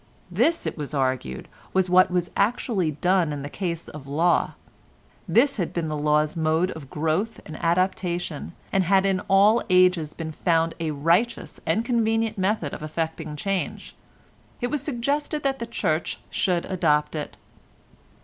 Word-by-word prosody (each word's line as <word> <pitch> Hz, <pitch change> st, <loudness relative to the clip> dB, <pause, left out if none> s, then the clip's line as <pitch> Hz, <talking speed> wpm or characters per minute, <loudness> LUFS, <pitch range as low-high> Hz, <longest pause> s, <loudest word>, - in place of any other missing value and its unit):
This, 260 Hz, -, +2 dB
it -, -, -4 dB
was 150 Hz, 0 st, -4 dB
argued, 130 Hz, -, -1 dB, 0.3 s
was 190 Hz, -1 st, +2 dB
what 185 Hz, +1 st, +5 dB
was 180 Hz, -1 st, -1 dB
actually 200 Hz, -4 st, +1 dB
done 175 Hz, +2 st, +1 dB
in 145 Hz, -1 st, -4 dB
the 145 Hz, -, -5 dB
case 170 Hz, -1 st, -4 dB
of 145 Hz, -2 st, -10 dB
law; 165 Hz, +5 st, +2 dB, 0.7 s
this 270 Hz, +3 st, +3 dB
had 180 Hz, -5 st, -2 dB
been 165 Hz, -2 st, -2 dB
the 155 Hz, -, -2 dB
law's 150 Hz, +1 st, +1 dB
mode 160 Hz, +3 st, +1 dB
of 145 Hz, -4 st, -9 dB
growth 160 Hz, +10 st, -1 dB
and 155 Hz, -, -8 dB
adaptation, 175 Hz, -, -1 dB, 0.2 s
and 195 Hz, -, +3 dB
had 190 Hz, +2 st, +4 dB
in 190 Hz, -1 st, +2 dB
all 205 Hz, +4 st, +5 dB
ages 180 Hz, -4 st, +3 dB
been 160 Hz, -1 st, -5 dB
found 165 Hz, 0 st, +1 dB
a 165 Hz, -1 st, -1 dB
righteous 170 Hz, +11 st, 0 dB
and 215 Hz, +8 st, +1 dB
convenient 225 Hz, -2 st, +1 dB
method 185 Hz, -6 st, 0 dB
of -, -, -6 dB
effecting 155 Hz, 0 st, -4 dB
change. 195 Hz, +4 st, -3 dB, 0.6 s
It 245 Hz, 0 st, -2 dB
was 295 Hz, -, -1 dB
suggested 290 Hz, +3 st, -2 dB
that 270 Hz, -1 st, 0 dB
the 235 Hz, -, -4 dB
Church 160 Hz, -8 st, -1 dB
should 175 Hz, -2 st, +1 dB
adopt 150 Hz, -5 st, +1 dB
it. 150 Hz, -, -5 dB
175 Hz, 160 wpm, -25 LUFS, 155-200 Hz, 0.7 s, what